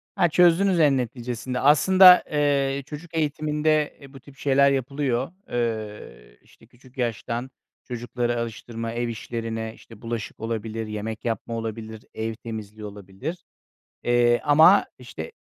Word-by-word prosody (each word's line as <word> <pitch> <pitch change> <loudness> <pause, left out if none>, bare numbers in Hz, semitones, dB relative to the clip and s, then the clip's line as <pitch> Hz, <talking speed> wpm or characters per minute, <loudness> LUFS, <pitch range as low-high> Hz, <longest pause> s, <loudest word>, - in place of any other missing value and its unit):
Ha, 175 - +3
çözdünüz 175 +2 +4
en 145 -4 +4
neticesinde. 125 +1 -4
Aslında, 180 +6 +7
eee, 140 -2 +1
çocuk 155 +3 -9
eğitiminde, 150 0 0
e, 140 0 -14
bu 135 - -11
tip 135 +1 -17
şeyler 140 0 +3
yapılıyor. 135 0 -1 0.2
Eee, 105 - -4
işte 115 - -22
küçük 125 +2 -21
yaştan 120 +1 -3 0.3
çocukları 120 0 -3
alıştırma, 115 0 -5
ev 120 +1 -2
işlerine, 115 -1 -4
işte, 115 -2 -16
bulaşık 115 -2 -5
olabilir, 115 0 -4
yemek 110 +1 -5
yapma 115 0 -3
olabilir, 110 -1 -6
ev 110 0 -3
temizliği 110 -2 -8
olabilir. 105 - -7 0.6
Eee, 120 0 +3
ama 160 +6 +6
işte - - -8
120 Hz, 130 wpm, -24 LUFS, 115-145 Hz, 0.6 s, Aslında